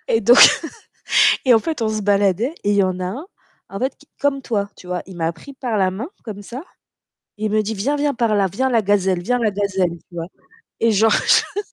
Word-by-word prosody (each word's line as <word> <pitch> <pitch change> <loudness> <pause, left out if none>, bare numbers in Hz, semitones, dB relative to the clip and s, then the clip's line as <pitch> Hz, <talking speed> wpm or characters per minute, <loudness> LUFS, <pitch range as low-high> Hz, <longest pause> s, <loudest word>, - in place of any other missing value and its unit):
Et 225 - +2
donc 240 +5 +5 1.1
et 250 -2 +5
en - - +6
fait 310 0 -4
on 220 - +1
se 215 -1 -3
baladait 205 - +1
et 205 - +1
il 205 - +2
y 200 - +4
en 185 -1 -1
a 180 - -2
un 265 - -6 0.4
en 195 - -6
fait 260 +2 -2
qui 290 - -22
comme 280 -1 0
toi, 200 -5 -2
tu - - -15
vois, 180 0 -3
il 190 -2 -11
m'a 165 0 -1
pris 280 - -13
par 240 -5 -3
la 185 -1 +2
main 220 - -6
comme 205 -3 -8
ça. 250 +8 -8 0.8
Il 215 0 -2
me 215 - +2
dit: 220 +2 -3
«Viens, 265 +9 -1
viens 290 -1 0
par 230 -3 0
là. 195 -1 +2
Viens 260 +9 -1
la 230 -3 +2
gazelle, 190 -3 +1
viens 245 +6 0
la 220 -3 +1
gazelle». 195 -2 -1 0.2
Tu 175 - -15
vois? 165 0 -5 0.5
Et 230 - +3
genre 215 +1 +3
je 410 - +2
215 Hz, 240 wpm, -20 LUFS, 195-245 Hz, 1.1 s, en